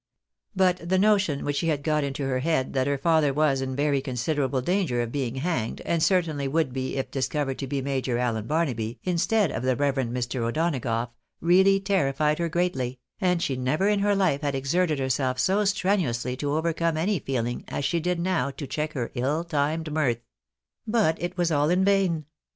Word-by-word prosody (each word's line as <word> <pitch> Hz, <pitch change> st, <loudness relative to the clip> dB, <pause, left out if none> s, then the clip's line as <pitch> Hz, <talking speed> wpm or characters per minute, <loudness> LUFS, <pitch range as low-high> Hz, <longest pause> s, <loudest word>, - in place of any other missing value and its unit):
But 180 Hz, -2 st, +1 dB
the 190 Hz, -, +3 dB
notion 195 Hz, -7 st, +2 dB
which 145 Hz, 0 st, -1 dB
she 165 Hz, -, 0 dB
had 145 Hz, -3 st, 0 dB
got 150 Hz, -1 st, +1 dB
into 140 Hz, 0 st, -3 dB
her 130 Hz, -1 st, 0 dB
head, 140 Hz, -2 st, 0 dB
that 130 Hz, -1 st, +1 dB
her 140 Hz, 0 st, +1 dB
father 155 Hz, 0 st, +3 dB
was 140 Hz, -1 st, +2 dB
in 130 Hz, 0 st, -3 dB
very 140 Hz, -1 st, +1 dB
considerable 130 Hz, +1 st, -1 dB
danger 150 Hz, -5 st, 0 dB
of 115 Hz, -, -5 dB
being 130 Hz, -3 st, -2 dB
hanged, 130 Hz, -6 st, -2 dB
and 170 Hz, -1 st, 0 dB
certainly 155 Hz, -5 st, +1 dB
■would 150 Hz, -3 st, 0 dB
be 130 Hz, 0 st, -3 dB
if 135 Hz, -, -3 dB
discovered 135 Hz, 0 st, -2 dB
to 135 Hz, -, -3 dB
be 135 Hz, 0 st, -2 dB
Major 130 Hz, -3 st, -1 dB
Allen 115 Hz, -3 st, -1 dB
Barnaby, 125 Hz, -8 st, -1 dB
instead 185 Hz, -, +1 dB
of -, -, -3 dB
the 130 Hz, 0 st, +1 dB
reverend 135 Hz, -3 st, 0 dB
Mr. 125 Hz, 0 st, -2 dB
O'Donagough, 120 Hz, -3 st, -1 dB, 0.3 s
really 190 Hz, +4 st, +4 dB
terrified 150 Hz, -6 st, +1 dB
her 170 Hz, -1 st, 0 dB
greatly, 135 Hz, -8 st, -1 dB, 0.2 s
and 180 Hz, -3 st, +1 dB
she 135 Hz, -, 0 dB
never 130 Hz, +9 st, 0 dB
in 210 Hz, -1 st, +2 dB
her 205 Hz, 0 st, +2 dB
life 180 Hz, -8 st, +1 dB
had 145 Hz, -2 st, -1 dB
exerted 155 Hz, +4 st, +1 dB
herself 130 Hz, -1 st, 0 dB
so 190 Hz, +11 st, +2 dB
strenuously 170 Hz, -, 0 dB
to 145 Hz, +1 st, -2 dB
overcome 165 Hz, 0 st, 0 dB
any 185 Hz, +3 st, +1 dB
feeling 120 Hz, -3 st, -2 dB
as 140 Hz, -, -3 dB
she 170 Hz, +4 st, +1 dB
now 175 Hz, -4 st, 0 dB
did 135 Hz, -, -11 dB
to 145 Hz, -, -4 dB
check 155 Hz, +3 st, -3 dB
her 125 Hz, -4 st, -3 dB
ill 145 Hz, +7 st, 0 dB
timed 155 Hz, 0 st, -1 dB
mirth; 120 Hz, -7 st, 0 dB, 0.6 s
but 210 Hz, -8 st, +2 dB
it 175 Hz, +2 st, -4 dB
was 175 Hz, -1 st, +1 dB
all 145 Hz, 0 st, +2 dB
in 185 Hz, +2 st, +3 dB
vain. 190 Hz, -6 st, +2 dB
145 Hz, 195 wpm, -26 LUFS, 130-170 Hz, 0.6 s, really